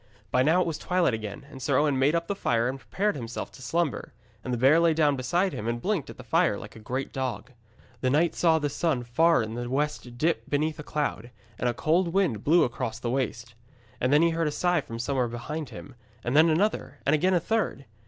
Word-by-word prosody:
By 125 - +3
now 160 +7 +4
it - - +1
was 160 -2 -3
twilight 180 -7 +1
again, 110 +5 -5
and 135 -3 -10
Sir 135 +1 +1
Owen 145 -3 +2
made 145 +5 +3
up 170 0 0
the 200 - -2
fire 120 -11 0
and 135 +2 -3
prepared 205 +8 -1
himself 120 -3 -5
to - - -14
slumber; 165 +2 -2 0.3
and 130 - -4
the 120 - 0
bear 135 +7 +5
lay 170 -1 +3
down 150 -3 +3
beside 170 +9 0
him 105 - -4
and 120 0 -1
blinked 195 - -1
at - - -10
the - - -10
fire - - +2
like - - -10
a - - -10
great 130 +5 -4
dog. 130 -1 -4 0.5
The 130 - +1
knight 160 +5 +2
saw 165 -2 +3
the 150 -2 0
sun 145 -3 -1
far 160 +4 +3
in 110 0 -5
the 120 +1 -4
west 135 -3 -2
dip 160 +6 0
beneath 150 +2 0
a - - -5
cloud, 145 -7 -3 0.3
and 125 - +1
a 120 - -2
cold 170 +6 +2
wind 155 - +1
blew 165 +4 +5
across 115 -2 -3
the 120 0 -3
waste. 120 -3 -2 0.5
And 130 - +1
then 150 +3 +5
he 170 - +3
heard 165 -1 0
a - - 0
sigh 175 +1 +1
from 115 -3 -8
somewhere 125 +1 0
behind 135 +5 -5
him, 125 +3 -10 0.3
and 120 +3 -1
then 160 +2 +6
another 155 -6 0
and 140 - +3
again 180 +5 +3
a - - +4
third. 200 -7 -1
145 Hz, 240 wpm, -27 LUFS, 125-165 Hz, 0.5 s, then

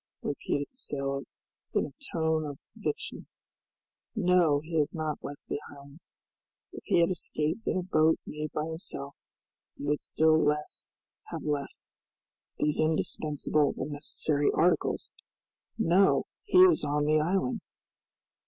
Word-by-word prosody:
repeated 145 - -1
the 255 - -21
sailor, 140 - -2 0.5
in - - +3
a - - -10 0.2
tone 160 -1 +1
of 145 -2 -5 0.2
conviction; 440 - -4 0.9
"no, 180 -7 +4
he 165 +2 -6
has 150 0 +1
not 155 -2 -3
left 145 +1 -7
the 145 - -3
island! 140 +2 -13 0.7
If - - -9
he 170 - +4
had 170 - +3
escaped 160 +3 -2
in - - +1
a 185 - -1
boat 160 -3 +3
made 150 0 -5
by 150 - -2
himself, 160 -4 -6 0.6
he - - -8
would 145 +1 0
still 160 0 +3
less 150 0 -1 0.4
have - - -6
left 145 -2 -4 0.7
these 150 0 +1
indispensable 155 -1 +1
and 150 - -3
necessary 145 0 +1
articles. 175 +2 +1 0.7
No! 195 -2 +4 0.2
he 410 - +2
is 370 - +5
on 145 0 +1
the 155 +1 +4
island!" 160 -4 0
155 Hz, 135 wpm, -29 LUFS, 145-170 Hz, 0.9 s, is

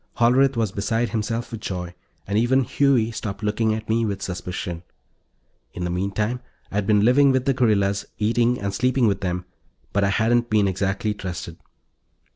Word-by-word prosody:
Hollerith 130 +2 +4
was 110 -4 0
beside 115 +4 -1
himself 115 +1 -2
with 115 -2 -6
joy, 90 -3 -4 0.3
and 100 - -3
even 125 +4 +3
Huey 125 -4 +2
stopped 105 -2 -5
looking 110 +1 +1
at 110 -1 -6
me 115 +1 +1
with 100 -3 -2
suspicion. 90 -2 -4 0.9
In 90 - -5
the 90 - -2
meantime, 100 +6 -1 0.3
I'd 100 -1 -1
been 105 -1 +4
living 135 +3 +5
with 130 -1 +1
the 135 - +3
guerrillas, 100 -5 +1
eating 115 +3 +1
and 100 0 -3
sleeping 125 +4 +2
with 100 -2 +1
them, 90 -1 -2 0.5
but 100 - +2
I 100 - +3
hadn't 120 +3 +2
been 105 -2 +3
exactly 95 +2 -1
trusted. 95 -4 -6
110 Hz, 170 wpm, -23 LUFS, 100-120 Hz, 0.9 s, living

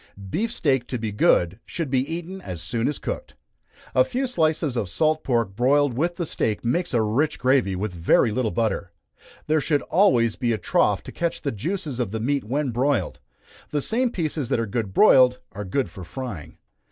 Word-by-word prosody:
Beef 220 +4 -1
steak 135 - 0
to 125 - -3
be 110 -2 -3
good, 95 -3 +2
should 160 -6 -4
be 130 - +3
eaten 175 +3 -5
as 90 - -6
soon 115 +7 -1
as 145 - -1
cooked. - - -5 0.6
A 130 - +5
few 255 - -2
slices 160 - 0
of 105 -6 -1
salt 155 - +1
pork 115 -6 0
broiled 140 +3 +3
with 170 +6 0
the 170 - -2
steak 110 -6 -2
makes 170 +9 0
a 115 - +3
rich 125 +9 0
gravy 125 -7 +2
with 100 +1 -3
a - - -10
very 90 +6 +3
little 115 +1 0
butter. 105 -5 -2 0.5
There 155 0 +2
should 145 0 +1
always 125 - +3
be 120 -3 0
a - - -1
trough 95 - +1
to - - -9
catch 170 -1 -3
the 140 - -1
juices 150 - -3
of 120 -5 0
the 110 +3 -4
meat 140 +5 0
when 135 +4 -1
broiled. 130 +3 0 0.5
The 150 - -1
same 240 - +1
pieces 155 - -2
that - - +1
are 115 - 0
good 110 -1 -3
broiled 125 - +6
are 105 - -6
good 130 +8 -1
for 95 - -10
frying. 100 - -7
130 Hz, 200 wpm, -24 LUFS, 110-155 Hz, 0.6 s, broiled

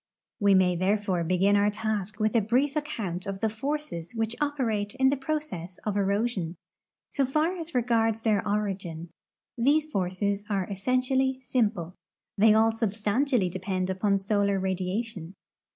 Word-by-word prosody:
'We 200 -1 +5
may 180 -1 +4
therefore 190 -1 +1
begin 185 +4 +3
our 205 0 +4
task 210 -1 -3
with 215 +1 +1
a 230 - +5
brief 255 +7 +1
account 220 - -3
of 195 -1 -4
the 220 - +1
forces 240 - -4
which 225 +1 -1
operate 235 -8 -1
in 265 0 +4
the - - +2
jn 295 +3 -1
ocess 185 - -7
of 210 -2 -1
erosion. 200 -3 0 0.6
So 280 - +1
far 305 +7 +1
as 335 -3 -7
regards 225 -2 +1
their 215 -3 +2
origin, 190 -5 -3 0.5
these 295 +5 +3
forces 200 -4 -1
are 195 -3 0
essentially 255 +5 +1
simple. 210 -9 0 0.4
They 215 +2 +5
all 220 +1 +5
substantially 225 +2 0
depend 185 +1 -2
upon 200 +1 +1
solar 200 0 +1
radiation. 190 0 -3
210 Hz, 150 wpm, -27 LUFS, 190-245 Hz, 0.6 s, We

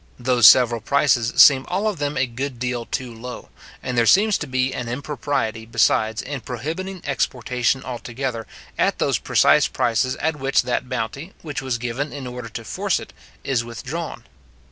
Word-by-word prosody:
Those 125 -3 +5
several 120 -1 +6
prices 125 -2 +2
seem 135 -2 +7
all 195 +4 -1
of 205 -7 -2
them 145 0 -2
a 135 - +2
good 130 +2 -5
deal 125 -1 -3
too 125 -2 -4
low; 125 +2 -9 0.3
and 125 - -3
there 120 -1 +3
seems 210 +2 +5
to 155 - -5
be 130 0 0
an 120 -2 -4
impropriety, 125 -3 -3
besides, 110 -1 +1
in 140 -1 -5
prohibiting 165 +11 -5
exportation 125 -1 -1
altogether 120 -1 -5 0.3
at - - +2
those - - +1
precise - - +4
prices 120 +2 0
at 160 0 -2
which 135 -1 +1
that 125 +1 -2
bounty, 130 - -4
which 145 -3 -4
was 130 -3 -2
given 125 +5 -3
in 140 -2 -7
order 125 -1 -7
to 115 +1 -7
force - - -1
it, - - -11 0.3
is 130 -4 0
withdrawn. 130 +8 -6
130 Hz, 170 wpm, -22 LUFS, 120-145 Hz, 0.3 s, seem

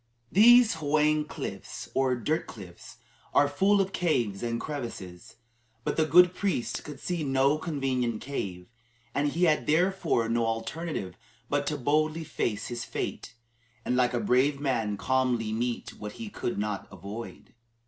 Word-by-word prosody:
These 235 -1 +7
"hwang" 150 0 +2
cliffs, - - -6
or 130 -1 +2
dirt 150 +7 -1
cliffs, 90 -5 -11 0.4
are 145 - +6
full 195 +8 +3
of 195 0 0
caves 120 - 0
and 115 -1 -2
crevices, 115 - -7 0.5
but - - -1
the 160 - +3
good 180 +4 +7
priest 185 -10 -2
could 150 -2 -9
see 175 -3 -2
no 135 +2 +2
convenient 130 -8 -1
cave, 95 -10 -5 0.5
and 145 +1 +1
he 170 +5 -1
had 155 -3 +3
therefore 165 -6 +2
no 115 0 +1
alternative 115 - -4 0.3
but 145 0 0
to 150 - -1
boldly 155 +4 +1
face 115 -8 -2
his 120 -1 -4
fate, - - -5 0.5
and 125 - +1
like 125 -1 +2
a - - +1
brave 130 +6 +2
man 115 -7 -1
calmly 125 -3 0
meet 120 +1 -2
what 105 -1 -6
he 230 -2 -7
could 120 - -3
not 105 -1 -3
avoid. 100 +5 -9
135 Hz, 150 wpm, -28 LUFS, 115-155 Hz, 0.5 s, These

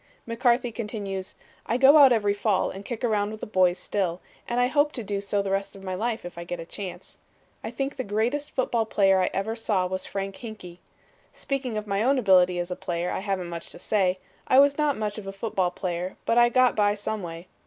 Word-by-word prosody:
McCarthy 240 +1 +1
continues, 205 -4 -5 0.3
"I 235 - +1
go 270 +3 +7
out 275 -3 +8
every 205 -4 +2
fall 205 -1 0
and 195 - -8
kick 240 +2 -6
around 210 -3 +1
with 215 0 -7
the - - -5
boys 185 -3 +2
still 185 -4 -2 0.3
and 240 +1 0
I 245 - +4
hope 290 +3 +2
to 240 - -5
do 200 -1 -3
so 200 0 -1
the 195 - -3
rest 195 0 -2
of 195 - -12
my 185 -1 -4
life 220 +2 -2
if 175 -1 -8
I - - -5
get 175 0 -5
a 165 - -6
chance. 185 +1 -8 0.4
I 220 - -4
think 270 +4 -3
the 260 - -3
greatest 240 +8 -1
football 235 -3 0
player 195 -3 +3
I 180 - +1
ever 215 +4 -2
saw 210 -5 0
was 185 +1 -4
Frank 195 -1 -4
Hinkey. 210 -7 -9 0.5
Speaking 265 -5 -3
of 210 - -3
my 200 -1 -1
own 265 +4 +3
ability 185 -6 +4
as 175 +1 -3
a - - -1
player, 175 0 -3
I - - -2
haven't 190 -3 -3
much 170 -1 -6
to - - -10
say. 190 -3 +1 0.3
I 260 - +4
was 280 +1 +6
not 300 -2 +1
much 215 0 -3
of 200 - -10
a - - -3
football 195 -2 -1
player 180 0 -4
but 230 - +2
I 240 0 +6
got 255 +1 +3
by 205 -1 +3
some 210 +1 -4
way. 170 0 -8
205 Hz, 235 wpm, -26 LUFS, 185-235 Hz, 0.5 s, out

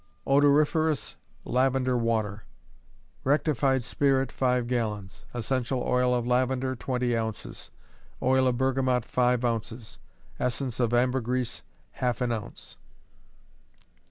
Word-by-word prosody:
Odoriferous 145 +2 +3 0.3
Lavender 130 0 +1
Water. 110 -3 -1 0.8
Rectified 135 -2 +2
spirit, 135 0 +1
five 125 -2 +1
gallons; 105 -5 -3
essential 125 +1 -1
oil 125 0 +2
of 120 -1 -1
lavender, 130 +1 +1
twenty 125 -1 -1
ounces; 110 -2 -5 0.5
oil 130 0 +3
of 125 -1 +1
bergamot, 130 -2 +1
five 125 0 +1
ounces; 115 -1 -4 0.4
essence 125 0 -2
of 120 -2 +1
ambergris, 125 0 0 0.3
half 125 -1 -2
an 125 -2 0
ounce. 110 -3 -6
125 Hz, 100 wpm, -27 LUFS, 120-130 Hz, 0.8 s, Odoriferous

